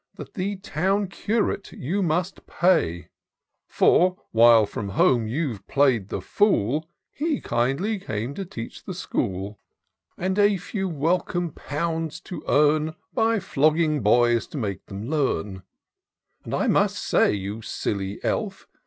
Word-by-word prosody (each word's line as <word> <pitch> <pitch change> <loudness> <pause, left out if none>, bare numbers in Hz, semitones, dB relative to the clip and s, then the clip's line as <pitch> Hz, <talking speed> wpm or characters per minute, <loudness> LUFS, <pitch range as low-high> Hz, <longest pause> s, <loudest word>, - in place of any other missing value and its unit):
That - - -10
the 200 0 -2
Town 195 +2 -1
Curate 205 0 -1
you 180 +10 -2
must 175 +2 -1
pay; 85 - +1 0.6
For, 185 +1 +3
while 115 -1 +6
from 100 0 -5
home 115 +3 +3
you 125 -2 -2
play'd 130 -8 +2
the - - -3
fool. 155 - +1 0.2
He 305 0 -1
kindly 140 - 0
came 115 - -4
to 195 - -4
teach 115 -10 -8
the - - -6
school; 95 +2 -3 0.6
And 185 +3 -1
a 205 -1 +4
few 190 +2 -4
w.elcome 170 +2 0
pounds 160 +1 -3
to 170 -5 -8
earn, 155 +2 +3 0.2
By 225 -2 +2
flogging 155 -3 +2
boys 120 +2 +3
to - - -8
make 100 -6 -3
them 100 +3 -6
learn: 105 - -1 0.8
But - - -3
I - - 0
must - - +2
say, - - +2
you 100 +2 -4
silly 100 -2 -3
elf! - - -2
150 Hz, 135 wpm, -24 LUFS, 115-185 Hz, 0.8 s, while